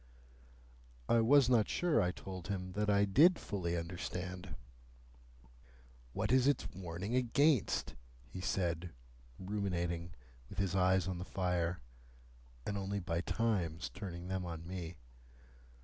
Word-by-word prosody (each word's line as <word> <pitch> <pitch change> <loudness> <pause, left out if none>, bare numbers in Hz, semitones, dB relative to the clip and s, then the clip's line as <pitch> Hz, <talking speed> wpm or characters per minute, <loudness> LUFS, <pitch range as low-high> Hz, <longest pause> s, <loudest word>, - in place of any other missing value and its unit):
I 115 - +4
was 135 +3 +6
not 120 -4 +4
sure, 175 -3 +2
I 90 - +2
told 95 -1 -8
him, 95 -2 -3
that 105 +2 -1
I 100 0 +4
did 155 - +6
fully 85 -4 -2
understand. 90 0 -5 1.6
"What - - -1
is 130 0 +5
its 145 - +2
warning 95 +3 -5
against?" 130 +2 +2 0.3
he 75 +10 -7
said, 90 -2 -1 0.4
ruminating, 90 -3 -2 0.3
with - - -10
his 100 -3 0
eyes 95 -1 +3
on 90 -2 -3
the - - -3
fire, 90 -3 -1 0.8
and 100 -1 -2
only 100 +1 -2
by 85 -2 -1
times 90 -6 -1
turning 90 -3 -6
them 95 0 -2
on 85 -2 -6
me. 90 -2 -5
95 Hz, 130 wpm, -35 LUFS, 85-105 Hz, 1.6 s, was